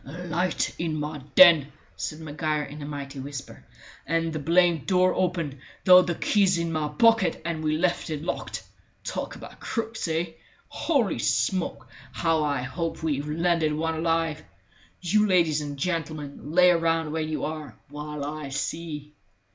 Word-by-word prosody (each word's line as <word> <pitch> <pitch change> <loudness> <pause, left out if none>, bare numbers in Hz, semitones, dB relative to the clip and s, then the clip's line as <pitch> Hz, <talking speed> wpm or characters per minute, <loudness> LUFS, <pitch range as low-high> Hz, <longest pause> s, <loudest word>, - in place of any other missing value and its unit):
"A 175 +6 -8
light 175 +1 0
in 160 -2 -1
my 150 0 -4 0.2
den," 165 -6 +8 0.2
said 155 - -5
Maguire 155 0 -2
in 145 +1 -9
a 145 - -6
mighty 140 -1 -6
whisper, 140 0 -8 0.4
"and 165 +1 0
the 155 - -2
blamed 170 +1 +3
door 185 -1 +4
open, 170 -7 -1 0.3
though 185 0 +9
the 175 -2 -2
key's 190 -1 +2
in 170 0 -1
my 155 -2 -1
pocket 225 +5 +3
and 165 -2 -3
we 155 0 +1
left 175 0 0
it 155 -1 -4
locked! 170 - -4 0.4
Talk - - -4
about - - -11
crooks, 225 -4 -3
eh? 165 +1 -1 0.4
Holy 245 - 0
smoke, 120 - 0 0.3
how 165 -2 +1
I 140 -4 0
hope 165 +5 -4
we've 150 -2 -1
landed 165 -1 +1
one 160 +2 -1
alive! 165 -1 0 0.6
You 210 +4 +3
ladies 165 -5 +3
and 145 -1 -5
gentlemen, 155 -3 -4
lay 180 +1 +6
round 165 -2 +1
where 160 +1 -1
you 155 0 -2
are, 150 -6 -6
while 150 0 -5
I 150 -1 -5
see." 150 +1 -4
160 Hz, 160 wpm, -26 LUFS, 150-175 Hz, 0.6 s, though